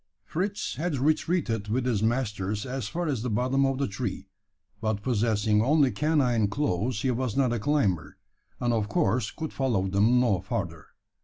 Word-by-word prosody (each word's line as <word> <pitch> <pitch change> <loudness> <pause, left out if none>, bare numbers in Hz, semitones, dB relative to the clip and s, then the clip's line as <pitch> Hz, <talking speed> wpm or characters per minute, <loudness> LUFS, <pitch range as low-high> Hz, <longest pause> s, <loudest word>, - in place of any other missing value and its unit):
Fritz 200 +5 -3
had 160 -2 -1
retreated 140 - 0
with 120 +4 0
his 115 -5 +1
masters 105 -3 -1
as 130 -4 -3
far 175 +10 -3
as 140 -8 -1
the 125 - -2
bottom 130 +5 +2
of 135 -1 -1
the 140 - 0
tree; 105 +1 -4 0.5
but 110 -2 -2
possessing 110 -3 +2
only 140 +2 +3
canine 125 -4 +2
claws, 105 -2 -1
he 130 - +2
was 125 -1 -2
not 130 -3 +3
a 120 - -1
climber; 100 - 0 0.4
and 120 -1 +1
of 110 -2 0
course 105 +3 +1
could 160 -1 -6
follow 115 -8 0
them 105 +6 +3
no 115 -7 +2
further. - - -4
120 Hz, 170 wpm, -27 LUFS, 105-135 Hz, 0.5 s, only